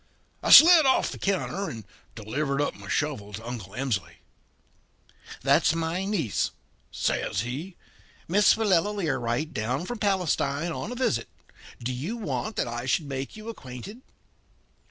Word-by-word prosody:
"I - - -2
slid 325 -3 +10
off 260 - +3
the - - -8
counter 195 0 -1
and 115 -2 -7 0.3
delivered 140 +6 -2
up 145 - 0
my - - -12
shovel 130 -9 -2
to 110 +4 -7
Uncle 110 -6 -7
Emsley. 125 -8 -2 1.3
"'That's 145 +4 +4
my 165 +3 -2
niece,' 170 - 0 0.4
says 95 - -1
he; 145 - -5 0.5
'Miss 200 +4 +5
Willella 205 -2 +2
Learight, 145 - -1
down 125 +9 -2
from 240 +3 -5
Palestine 175 -5 0
on 205 +7 -5
a - - -4
visit. 180 - 0 0.6
Do 125 +2 -2
you 160 - -4
want 220 -1 -3
that - - -1
I 120 +1 -4
should 155 +3 +1
make 135 +5 -5
you 215 +1 -10
acquainted?' 195 - -8
155 Hz, 145 wpm, -26 LUFS, 125-200 Hz, 1.3 s, slid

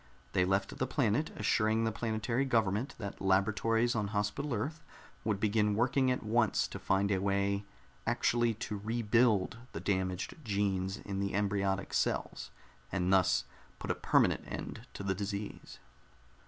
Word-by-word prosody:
They 90 - +3
left 95 +2 0
the 130 - -1
planet, 130 +2 +1
assuring 110 +1 +2
the 110 - +1
planetary 115 +3 -1
government 115 -2 +1
that 100 -3 -6
laboratories 110 +5 +2
on 110 -3 0
Hospital 105 +8 -2
Earth 145 +8 -3 0.4
would 105 -3 0
begin 105 -1 +2
working 130 +3 +2
at 125 - 0
once 110 0 +2
to - - -6
find 100 +1 +1
a 95 -1 +1
way 100 0 0 0.4
actually 120 -1 +2
to 105 -1 -4
rebuild 115 -2 +2 0.2
the - - -4
damaged 95 0 -1
genes 100 -3 0
in 100 -1 -5
the 100 -1 -1
embryonic 100 -1 0
cells, - - -1 0.4
and 95 0 +1
thus 95 -1 +4 0.3
put - - -3
a - - +2
permanent - - +2
end - - -6
to - - -5
the 95 -1 +1
disease. 100 +1 -5
105 Hz, 150 wpm, -32 LUFS, 100-115 Hz, 0.4 s, thus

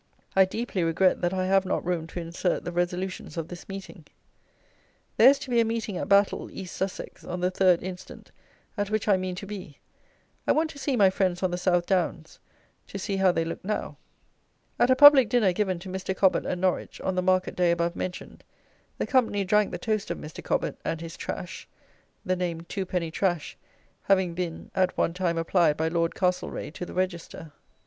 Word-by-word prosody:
I 190 0 +7
deeply 200 -2 -3
regret 165 +3 +2
that 175 - +1
I 185 -1 -1
have 195 0 +3
not 185 - -2
room 170 -2 -1
to 175 - -6
insert 170 +2 -2
the 175 - -3
resolutions 180 +1 -3
of 165 0 -4
this 175 +2 -10
meeting. 195 -4 -8 1.1
There - - +9
is 280 - +4
to 265 - -8
be 240 - +3
a - - +5
meeting 225 -3 -3
at - - -4
Battle 200 0 +3
(East 185 -2 -8
Sussex) 190 0 -5
on 180 0 -5
the 180 +1 +1
3rd 185 -2 +3
instant, 185 0 -9 0.5
at 205 -1 -1
which 215 0 -1
I 205 - +5
mean 185 -1 -3
to 195 - -7
be. 190 -8 -8 0.7
I - - +5
want 315 0 +1
to 285 - -12
see 270 0 0
my 195 -5 +5
friends 185 -1 0
on 185 - +1
the 175 - -1
South 175 -1 +2
Downs. 175 -4 -1 0.5
To - - -7
see 195 0 -2
how 190 -1 +4
they 165 -1 -1
look 165 - -6
now. 210 +3 -3 0.8
[At 240 - +4
a 260 - +6
public 280 -4 +9
dinner 215 -6 +3
given 190 -2 0
to 175 - -10
Mr. 190 0 -4
Cobbett 190 -2 +3
at 180 - -1
Norwich, 185 0 -1
on 190 - -1
the 185 - 0
market 185 0 +1
day 180 -1 +2
above 170 0 0
mentioned, 180 -1 -6 0.5
the - - -1
company 225 -6 +2
drank 210 +2 +3
the - - -5
toast 215 -3 -2
of - - -2
Mr. 150 - -9
Cobbett - - -1
and 165 - -2
his 165 0 -7
"Trash," 180 - -6 0.6
the 185 - +1
name 175 -2 -3
"two 190 +2 -5
penny 170 -3 -2
trash," 175 -3 -1 0.5
having 190 -3 +2
being 170 -1 -5
at 185 -1 +1
one 165 - +1
time 175 -2 -1
applied 165 -2 +2
by 160 +1 0
Lord 165 0 0
Castlereagh 180 -4 -2
to 180 - -6
the - - -9
Register. 170 -3 -3
185 Hz, 205 wpm, -26 LUFS, 175-195 Hz, 1.1 s, There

